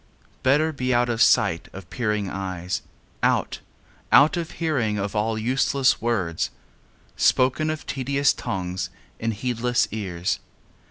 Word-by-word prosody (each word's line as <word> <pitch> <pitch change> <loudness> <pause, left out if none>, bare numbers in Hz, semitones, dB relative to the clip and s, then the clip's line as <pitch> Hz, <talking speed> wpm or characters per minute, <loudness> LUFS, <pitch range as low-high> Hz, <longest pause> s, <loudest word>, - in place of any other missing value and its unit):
Better 150 +5 +3
be 130 -2 0
out 120 0 +2
of 115 -1 -1
sight 85 0 +4
of 95 -2 -9
peering 105 -1 -1
eyes; 95 -1 -3 0.4
Out - - +1 0.5
out 145 +5 +7
of 170 -2 -3
hearing 130 -11 0
of 100 +1 -3
all 110 +1 0
useless 130 +3 +2
words, 95 -9 0 0.7
Spoken 130 +5 +3
of 155 -1 -4
tedious 140 +1 +1
tongues 90 -1 -3 0.3
in 115 - -1
heedless 120 +2 0
ears. 95 -5 -2
115 Hz, 125 wpm, -24 LUFS, 95-135 Hz, 0.7 s, out